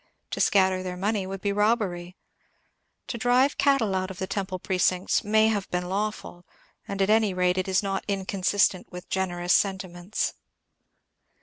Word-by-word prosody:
To - - -2
scatter 190 -2 +3
their 180 -1 -5
money 200 0 -1
would 195 0 -6
be 200 - 0
robbery. 200 -5 0 0.9
To 235 - -5
drive 250 +4 +2
cattle 275 -8 +3
out 185 0 -1
of 190 - -8
the 190 - -2
temple 190 -1 -3
precincts 185 0 +1
may 215 +1 +4
have 205 -3 -2
been 180 0 -2
lawful, 200 -3 -3 0.4
and 200 -1 -1
at 200 - +2
any 215 -3 +3
rate 180 0 +2
it 185 - -2
is 190 +1 +1
not 195 -1 -2
inconsistent 195 -1 0
with 180 0 -9
generous 180 -1 0
sentiments. 190 -1 -1
190 Hz, 160 wpm, -26 LUFS, 185-210 Hz, 0.9 s, may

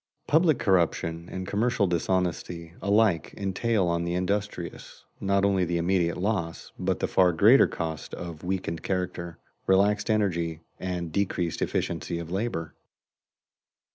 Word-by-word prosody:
Public 160 -2 +4
corruption 85 -2 +1
and 95 0 -4
commercial 115 0 +1
dishonesty 85 -1 -1
alike 100 -5 +2
entail 100 +1 0
on 85 0 0
the 85 0 -2
industrious 95 -1 -3
not 100 0 +2
only 95 -2 +2
the 85 0 0
immediate 85 0 +1
loss, 90 -4 -2
but - - 0
the - - 0
far 90 -1 +4
greater 110 +11 +6
cost 80 -3 -5
of 85 -3 -7
weakened 90 -3 -2
character, 90 -2 -3 0.3
relaxed 100 +4 +3
energy, 85 -7 0 0.2
and 90 -3 -3
decreased 90 -3 -1
efficiency 85 +1 -1
of 85 0 -6
labor. 95 -6 -2
90 Hz, 130 wpm, -27 LUFS, 85-100 Hz, 0.3 s, greater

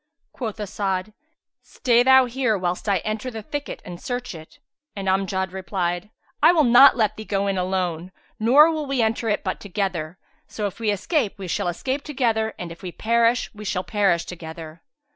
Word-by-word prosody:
Quoth 225 -4 -5
As'ad, 195 -1 -3 0.5
"Stay 240 -1 +2
thou 265 +1 +6
here, 245 -3 0
whilst 180 +2 -2
I 200 - +3
enter 215 +3 -3
the 225 -3 -7
thicket 290 +5 -6
and 175 -1 -9
search 245 -2 -4
it;" 160 - -12 0.4
and 195 -1 -5
Amjad 190 -1 0
replied, 180 0 -3 0.3
"I 315 +3 +7
will 320 -3 +4
not 250 +2 +7
let 215 -2 +1
thee 215 - -6
go 200 -2 -1
in 195 -1 0
alone: 180 -2 -2 0.3
nor 280 +9 +6
will 310 -2 -3
we 270 -3 +1
enter 225 +1 0
it 210 - 0
but - - -3
together; 180 -4 -3 0.3
so 210 - -4
if 200 +2 -5
we 225 -2 0
escape, 215 - 0
we 195 -2 -7
shall 175 - -1
escape 260 +11 -2
together 230 -6 -1
and 175 -2 -6
if 170 - -11
we 180 - -6
perish, 230 +4 +1
we 210 0 -10
shall 185 -2 -2
perish 180 -3 +1
together." 160 -1 -9
210 Hz, 185 wpm, -23 LUFS, 185-235 Hz, 0.5 s, I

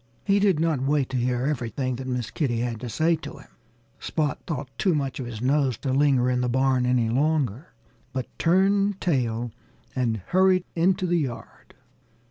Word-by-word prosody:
He 200 0 +3
did 195 -6 +3
not 160 -5 +1
wait 140 0 +1
to 130 - -2
hear 125 +1 0
everything 130 -2 -2
that 130 0 -6
Miss 125 -3 -3
Kitty 120 -7 -1
had 120 -2 -3
to 120 - -6
say 160 +7 +2
to - - -9
him. - - -15 0.5
Spot 150 -3 -1
thought 145 -4 -3
too 185 -5 +2
much 140 -3 -2
of 125 - -4
his 115 -1 -6
nose 135 -2 +2
to 130 - -2
linger 135 -3 +3
in 125 0 +1
the 125 - 0
barn 130 0 +2
any 125 -2 +2
longer, 140 - 0 0.4
but 130 -2 -3
turned 195 +3 +3
tail 120 -7 -1 0.4
and 120 -3 0
hurried 185 0 +4
into 185 +2 +2
the 175 -1 +2
yard. 130 -6 -7
135 Hz, 180 wpm, -25 LUFS, 125-165 Hz, 0.5 s, hurried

